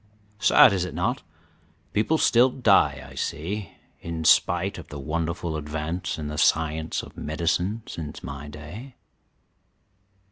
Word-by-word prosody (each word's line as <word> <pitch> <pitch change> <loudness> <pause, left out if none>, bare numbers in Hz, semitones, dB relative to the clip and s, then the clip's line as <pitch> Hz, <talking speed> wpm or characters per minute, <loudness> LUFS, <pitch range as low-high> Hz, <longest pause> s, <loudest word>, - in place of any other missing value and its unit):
"Sad, 100 0 +7
is 95 -2 0
it 90 - -5
not? - - -1 0.7
People 110 +10 +2
still 125 -3 +5
die, 125 0 +3
I - - -13
see, 95 +7 -4 0.3
in 80 -1 -5
spite 90 +4 +3
of 85 - -10
the 75 - -8
wonderful 85 +3 -3
advance 75 +3 -3
in 75 -1 -5
the 75 0 -4
science 80 0 +1
of - - -12
medicine 90 +7 -1
since 75 -3 -7
my 70 +2 -7
day." 85 - -10
85 Hz, 135 wpm, -25 LUFS, 75-100 Hz, 0.7 s, Sad